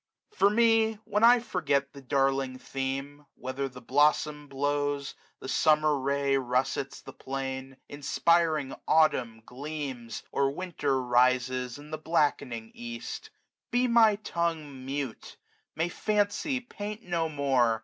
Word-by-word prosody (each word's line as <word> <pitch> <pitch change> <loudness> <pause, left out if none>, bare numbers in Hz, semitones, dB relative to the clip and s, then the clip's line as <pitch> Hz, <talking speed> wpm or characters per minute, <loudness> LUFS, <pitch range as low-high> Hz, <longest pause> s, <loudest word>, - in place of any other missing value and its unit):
For 200 - +4
me, 225 0 +4
when 210 +2 0
I 240 +1 +8
forget 140 - -1
the 140 - -10
darling 135 0 0
theme, 135 +2 -4
"Whether 130 +2 -4
the 125 0 -12
blossom 150 +3 +2
blows, 145 0 -1 0.3
the - - -8
Summer 155 +2 +3
ray 140 +1 0
95 130 -2 -4
Russets 130 +2 -1
the - - -11
plain, 135 0 -5
inspiring 150 +1 +1
Autumn 125 -8 +2
gleams. 135 -4 -6
Or 140 0 +2
Winter 150 -7 -1
rises 125 0 +2
in 150 +1 -12
the 155 - -4
blackening 140 -8 0
east; 120 0 -7 0.4
Be 250 0 +2
my 230 -3 +5
tongue 165 -9 -3
mute, 135 -3 -5 0.4
may 165 +2 0
fancy 210 - 0
paint 215 -2 -7
no 170 -2 -1
more. 130 -6 +2
140 Hz, 130 wpm, -28 LUFS, 130-165 Hz, 0.4 s, I